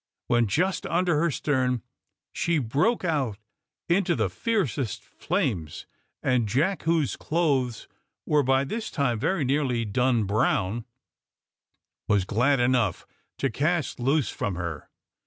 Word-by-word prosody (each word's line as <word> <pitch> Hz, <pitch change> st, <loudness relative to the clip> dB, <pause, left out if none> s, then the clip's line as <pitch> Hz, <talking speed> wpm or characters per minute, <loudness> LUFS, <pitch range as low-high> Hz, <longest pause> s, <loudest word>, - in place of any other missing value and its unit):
When 120 Hz, -1 st, +2 dB
just 180 Hz, -, 0 dB
under 175 Hz, -3 st, +1 dB
her 170 Hz, +2 st, +2 dB
stern, 130 Hz, -4 st, 0 dB, 0.5 s
she 170 Hz, -1 st, +1 dB
broke 150 Hz, -, +1 dB
out 140 Hz, -, 0 dB, 0.5 s
into 175 Hz, 0 st, +2 dB
the 110 Hz, -8 st, 0 dB
fiercest 150 Hz, -, -1 dB
flames, 80 Hz, -4 st, -2 dB, 0.4 s
and 125 Hz, -4 st, +2 dB
Jack, 155 Hz, -, +1 dB
whose 160 Hz, -5 st, +2 dB
clothes 140 Hz, -8 st, 0 dB, 0.4 s
were 150 Hz, -1 st, +3 dB
by 135 Hz, 0 st, +2 dB
this 220 Hz, +11 st, -4 dB
time 125 Hz, -7 st, 0 dB
very 170 Hz, -, 0 dB
nearly 130 Hz, -4 st, +1 dB
done 120 Hz, +2 st, +1 dB
brown, 105 Hz, +1 st, 0 dB, 1.2 s
was 100 Hz, -3 st, +2 dB
glad 125 Hz, +8 st, +2 dB
enough 120 Hz, -6 st, +1 dB, 0.3 s
to 135 Hz, -, 0 dB
cast 155 Hz, +3 st, 0 dB
loose 135 Hz, 0 st, +1 dB
from 95 Hz, -, -3 dB
her. 85 Hz, -3 st, -5 dB
130 Hz, 125 wpm, -26 LUFS, 115-160 Hz, 1.2 s, were